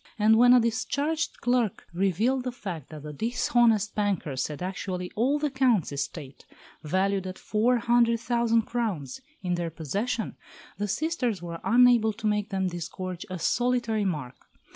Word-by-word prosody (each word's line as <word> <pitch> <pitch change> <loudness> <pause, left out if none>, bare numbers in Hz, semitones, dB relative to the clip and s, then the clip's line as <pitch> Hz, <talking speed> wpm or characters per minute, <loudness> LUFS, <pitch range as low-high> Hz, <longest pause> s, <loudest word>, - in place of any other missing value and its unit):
And 220 +1 +5
when 245 0 +7
a - - +7
discharged 280 +8 -1
clerk 245 -4 0
revealed 200 +8 +1
the 250 - -1
fact 185 - -7
that 155 -2 -9
the 150 0 -7
dishonest 225 - +2
bankers 180 -11 -1
had 150 +3 -6
actually 185 -1 -4
all 260 +7 +2
the 295 -1 -1
Count's 255 - +2
estate, 140 -1 -6 0.4
valued 190 +4 0
at 185 - -6
four 235 +4 +1
hundred 235 0 +3
thousand 230 -1 +1
crowns, 215 - -3 0.2
in 180 -1 0
their 175 -1 -2
possession, 200 - -3 0.4
the 205 - -1
sisters 245 - -1
were 170 -1 -6
unable 240 -2 +5
to 220 +1 -9
make 210 -1 0
them 190 -1 -1
disgorge 180 0 -5
a 185 - -4
solitary 235 +2 +1
mark. 150 -10 -4
210 Hz, 155 wpm, -27 LUFS, 180-240 Hz, 0.4 s, when